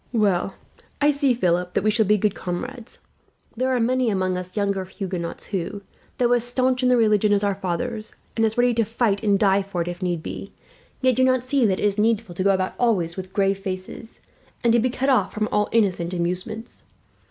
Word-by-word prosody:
"Well 195 -4 +1 0.4
I 290 +1 +4
see, 280 -3 +2
Philip, 180 -4 0
that - - +1
we 215 - +3
shall 215 -1 +2
be 210 +1 +4
good 210 0 +1
comrades. 230 +7 -6 0.5
There 255 +3 0
are 255 -1 +1
many 250 +1 +2
among 185 -2 0
us 180 +2 -5
younger 200 -2 0
Huguenots 185 -3 -5
who, 195 +2 -3 0.3
though 245 -1 +2
as 240 -1 +2
staunch 255 +1 +1
in 255 - +3
the 250 - +4
religion 215 -2 +3
as 205 0 +3
our 200 -1 +2
fathers, 215 +4 -4 0.2
and 225 - +1
as 220 0 +1
ready 245 0 +4
to 230 0 +2
fight 220 -2 0
and 205 -2 +3
die 195 -1 +3
for 195 -2 -5
it - - -10
if 175 +1 -5
need 175 -3 -2
be, - - -7 0.5
yet 255 -2 +3
do 260 - +3
not 255 -1 +3
see 255 -2 +2
that 190 -1 0
it - - 0
is 205 0 +1
needful 220 -3 +1
to 185 - -2
go 200 - +3
about 190 -1 +1
always 185 -9 +1
with 185 0 -7
grave 195 0 +1
faces, 190 +3 -6 0.4
and 235 -1 +4
to 235 - +5
be 255 +3 +1
cut 260 +2 -2
off 205 -7 +2
from 215 0 0
all 210 0 +1
innocent 185 -5 +1
amusements. 180 +6 -3
210 Hz, 220 wpm, -23 LUFS, 185-240 Hz, 0.5 s, to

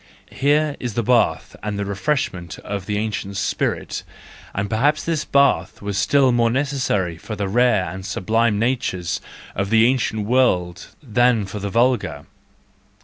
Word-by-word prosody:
Here 145 +2 +1
is 120 -4 -4
the 120 - 0
bath 120 +1 +1
and 105 -1 -3
the 100 - -2
refreshment 100 - -2
of 100 -2 -5
the 105 - -1
ancient 105 -2 -3
spirit: 95 - -2 0.3
— - - -20
and 100 +1 -1
perhaps 140 +9 +1
this 160 -3 -1
bath 140 -11 +2
was 100 -1 -4
still 130 +6 +3
more 120 -1 +3
necessary 130 - -1
for 110 - -6
the 100 -1 -2
rare 115 -2 +3
and 95 +1 -6
sublime 110 +3 +1
natures 110 -7 -1 0.3
of 100 0 -2
the 110 +1 +5
ancient 115 -4 0
world 95 -8 +1 0.2
than 120 -3 +2
for 100 +2 -6
the 100 0 -3
vulgar. 115 - +1
110 Hz, 155 wpm, -21 LUFS, 100-125 Hz, 0.3 s, the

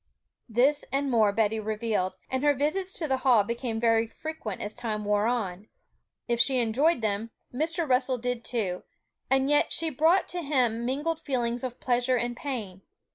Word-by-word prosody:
This 265 +6 +3
and 275 0 0
more 220 -4 +4
Betty 220 +1 +1
revealed; 215 -3 -1
and 260 +1 -1
her 290 -1 +4
visits 360 +8 -1
to 320 - -2
the 265 -2 +1
Hall 250 -5 +4
became 235 +1 -3
very 225 -1 +3
frequent 235 -6 -6
as 210 - -5
time 215 -3 -4
wore 210 +1 +2
on. 210 -5 -2 0.6
If 235 -1 0
she 260 +2 +4
enjoyed 250 +6 +2
them, 215 +1 -1 0.2
Mr. 325 +5 -1
Russell 255 0 +2
did 245 0 -3
too, 195 -7 -2 0.5
and 265 0 +3
yet 295 0 +3
she 325 -1 0
brought 325 +7 +3
to 355 0 -3
him 245 -6 +1
mingled 300 +5 -1
feelings 245 -5 -2
of 250 -1 -5
pleasure 250 +1 +1
and 240 +1 -2
pain. 220 -9 -5
245 Hz, 175 wpm, -27 LUFS, 220-280 Hz, 0.6 s, more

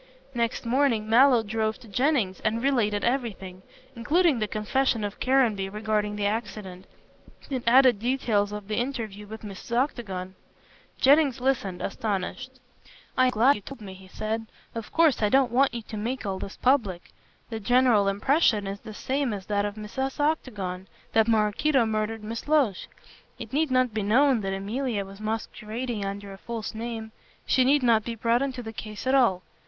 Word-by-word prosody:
Next 235 0 -1
morning 235 -3 +2
Mallow 245 +1 +5
drove 220 +1 -1
to 235 - -13
Jennings 230 -3 +1
and 225 +2 -1
related 215 -7 +1
everything, 215 -7 -2 0.3
including 300 +3 +2
the 215 - 0
confession 225 +2 0
of 205 0 -5
Caranby 235 -7 +2
regarding 210 0 -1
the 205 -1 -2
accident, 205 -3 -4 0.6
and 260 -2 -1
added 250 -2 +6
details 225 -4 0
of 210 -1 -7
the 215 - -2
interview 225 -5 -3
with 220 +1 -9
Mrs. 210 +3 -5
Octagon. 195 -9 -2 0.7
Jennings 280 -1 +4
listened, 240 -9 -1
astonished. 225 +6 -3 0.6
"I 255 - +4
am - - +4
glad 250 +4 +4
you - - -10
told 270 +4 -10
me," 195 -2 -8
he 190 0 -14
said, 220 +3 -4 0.3
"of 230 -2 -6
course 325 -7 +3
I 210 - +3
don't 265 0 +3
want 265 +3 +3
you 235 -1 -5
to 215 - -7
make 235 +4 -3
all 190 -1 -2
this 195 - -7
public. 225 -10 +1 0.4
The 225 - -3
general 240 -2 +3
impression 210 +1 +2
is 195 +1 -5
the 215 0 -10
same 265 -1 -1
as 195 -2 -6
that 205 0 0
of 205 0 -4
Mrs. 250 +7 -4
Octagon, 205 -12 -2 0.3
that 225 0 +4
Maraquito 230 +5 +2
murdered 220 0 -2
Miss 225 +4 -6
Loach. 285 -10 +2 0.5
It - - -9
need 310 +1 +1
not 255 -2 +2
be 215 - -1
known 245 +4 +3
that 195 -1 -2
Emilia 210 +2 -2
was 195 +2 -12
masquerading 220 +1 -4
under 200 0 -5
a 195 - -12
false 230 -1 -5
name. 225 0 -5 0.3
She 260 - +3
need 275 +1 +3
not 230 -3 +4
be 235 +1 -4
brought 230 +2 +1
into 260 -3 -3
the 220 0 -7
case 215 +1 -7
at 260 - +2
all. 230 -9 +3
225 Hz, 175 wpm, -26 LUFS, 205-255 Hz, 0.7 s, added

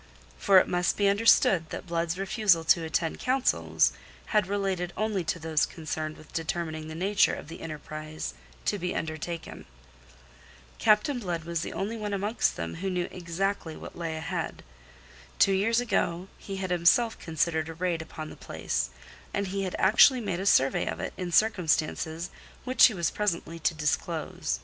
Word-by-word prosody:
For 195 -2 +5
it - - +6
must 175 -1 +1
be 205 - +3
understood 200 -5 +4
that - - -6
Blood's 170 0 -1
refusal 195 -3 +2
to 165 +1 +4
attend 160 0 -1
councils 260 0 +2 0.4
had 210 -3 +3
related 190 -3 -1
only 210 -3 0
to 165 - -1
those 160 -2 +1
concerned 155 -1 -5
with 155 - -16
determining 160 -1 -3
the 160 - -7
nature 195 +4 +2
of - - -9
the 165 - -9
enterprise 155 - -6 0.3
to 205 - 0
be 180 +1 -2
undertaken. 160 +1 -5 1.1
Captain 220 +5 +3
Blood 175 -6 -3
was 170 0 -2
the - - -5
only 215 +4 -3
one 210 -2 -3
amongst 205 +4 0
them 85 0 -4
who 190 +3 -2
knew 180 -1 -1
exactly 175 -1 -3
what - - -10
lay 165 -2 -3
ahead. 155 - -4 0.7
Two 195 - +5
years 225 +5 +2
ago 195 -6 -1
he 195 - -6
had 190 -1 -3
himself 180 +7 +3
considered 160 0 -1
a 165 - -7
raid 170 -1 -1
upon 155 -1 -8
the - - -10
place, - - -3 0.5
and 200 -1 -1
he 195 +1 -2
had 185 - -3
actually 240 +6 +6
made 200 -6 -2
a 195 - -2
survey 135 -7 +3
of - - -3
it - - -4
in 180 -2 -4
circumstances 170 -4 +1 0.3
which 255 0 +6
he 230 - -4
was 170 -2 0
presently 170 -5 -2
to 160 - 0
disclose. 150 - -2
175 Hz, 170 wpm, -28 LUFS, 160-200 Hz, 1.1 s, it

